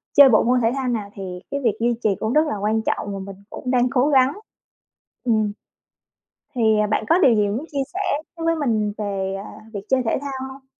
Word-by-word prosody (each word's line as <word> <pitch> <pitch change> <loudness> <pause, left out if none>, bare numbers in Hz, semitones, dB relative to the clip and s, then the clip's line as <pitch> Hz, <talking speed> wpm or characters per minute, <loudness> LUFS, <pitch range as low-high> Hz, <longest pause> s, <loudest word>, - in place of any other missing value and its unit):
chơi 280 -2 +9
bộ 215 - +5
môn 250 +1 +2
thể 225 +1 +2
thao 265 -2 -2
nào 215 -4 -2
thì 185 -2 -6
cái 280 - -1
việc 220 -2 +1
duy 235 0 +1
trì 205 -3 +2
cũng 220 +3 -1
rất 305 +1 +4
là 250 - -2
quan 215 +2 0
trọng 205 -2 -2
và 195 - -5
mình 195 0 -8
cũng 250 - -5
đang 250 0 +3
cố 265 +2 +2
gắng. 265 0 +4 0.9
Ừm. 215 -4 +1 1.0
Thì, 220 -3 +3
à, 210 - +2
bạn 215 +1 0
có 340 - +5
điều 255 -10 +5
gì 205 -1 +2
muốn 235 +9 -3
chia 280 -1 0
sẻ 390 - -3 0.4
với 330 0 -4
với 330 0 +2
mình 220 -8 0
về, 195 -2 -2
ờ, - - -9 0.2
việc 200 - -4
chơi 260 -1 +3
thể 225 - 0
thao 280 -1 -4 0.2
hông? 265 0 -15
230 Hz, 235 wpm, -22 LUFS, 210-265 Hz, 1.0 s, chơi